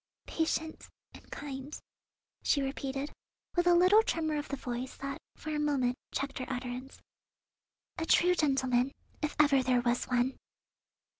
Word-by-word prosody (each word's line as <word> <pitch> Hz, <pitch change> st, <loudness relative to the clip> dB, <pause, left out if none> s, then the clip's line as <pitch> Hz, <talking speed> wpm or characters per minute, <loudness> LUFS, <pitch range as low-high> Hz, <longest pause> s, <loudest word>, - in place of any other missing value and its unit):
Patient 320 Hz, 0 st, -2 dB, 0.2 s
and -, -, -15 dB
kind," 275 Hz, 0 st, -6 dB, 0.6 s
she 280 Hz, -, +2 dB
repeated, 270 Hz, +1 st, -3 dB, 0.4 s
with 350 Hz, 0 st, +2 dB
a 350 Hz, -, +7 dB
little 370 Hz, +5 st, +7 dB
tremor 320 Hz, -7 st, -1 dB
of 290 Hz, -, -5 dB
the 280 Hz, -, -2 dB
voice 250 Hz, -1 st, -5 dB
that 275 Hz, 0 st, -5 dB, 0.2 s
for 310 Hz, -, -6 dB
a 300 Hz, -, 0 dB
moment 275 Hz, -5 st, +1 dB, 0.2 s
checked 275 Hz, 0 st, -3 dB
her 255 Hz, -, -4 dB
utterance, 250 Hz, +1 st, -5 dB, 1.0 s
"a 325 Hz, -, -2 dB
true 360 Hz, +1 st, +5 dB
gentleman, 265 Hz, -5 st, +2 dB, 0.3 s
if 300 Hz, -1 st, -1 dB
ever 285 Hz, -3 st, +6 dB
there 250 Hz, -1 st, +2 dB
was 240 Hz, 0 st, +1 dB
one." 250 Hz, +1 st, 0 dB
275 Hz, 145 wpm, -31 LUFS, 255-305 Hz, 1.0 s, a